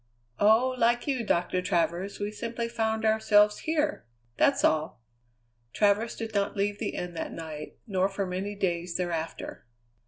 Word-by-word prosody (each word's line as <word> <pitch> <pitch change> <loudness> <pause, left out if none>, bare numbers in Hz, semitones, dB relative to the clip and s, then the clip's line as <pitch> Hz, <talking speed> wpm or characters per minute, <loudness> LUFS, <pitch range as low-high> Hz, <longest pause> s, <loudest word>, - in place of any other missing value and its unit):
"Oh, 225 +5 +5
like 240 +1 +3
you, 265 -4 0
Doctor 180 -2 +1
Travers, 175 +2 -1
we 205 0 -2
simply 230 +2 -4
found 220 -1 -1
ourselves 210 -1 +4
here! 310 -1 -1 0.3
That's 280 - +3
all." 155 -6 +1 0.7
Travers 210 +2 +2
did 225 -1 -5
not 200 0 0
leave 205 +1 0
the - - -3
inn 180 -1 -4
that 165 - -4
night, 155 -2 -7
nor 190 -3 +1
for 195 0 -2
many 190 +3 -3
days 175 -3 -1
thereafter. 170 -3 -4
205 Hz, 150 wpm, -28 LUFS, 180-225 Hz, 0.7 s, Oh